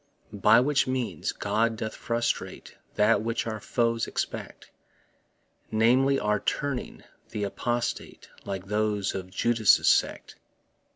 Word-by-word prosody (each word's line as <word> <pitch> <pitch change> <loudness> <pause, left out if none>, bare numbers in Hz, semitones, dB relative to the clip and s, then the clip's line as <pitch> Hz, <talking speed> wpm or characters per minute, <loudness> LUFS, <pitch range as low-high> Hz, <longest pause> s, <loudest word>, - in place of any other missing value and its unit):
By 105 +3 +5
which 140 +1 +2
means 125 -11 -2
God 110 +3 0
doth 110 0 -4
frustrate 115 0 -3 0.2
That 105 +2 +3
which 115 +1 -2
our 110 -1 -4
foes 115 0 0
expect - - -5 1.0
Namely, 125 +5 +3
our 105 0 +1
turning 140 +4 -3 0.3
th' 105 -2 -3
apostate, 120 +4 -3 0.2
Like 95 -1 -5
those 105 -1 -1
of 95 -1 -6
Judas' 115 +2 +3
sect. - - +1
110 Hz, 115 wpm, -27 LUFS, 105-120 Hz, 1.0 s, By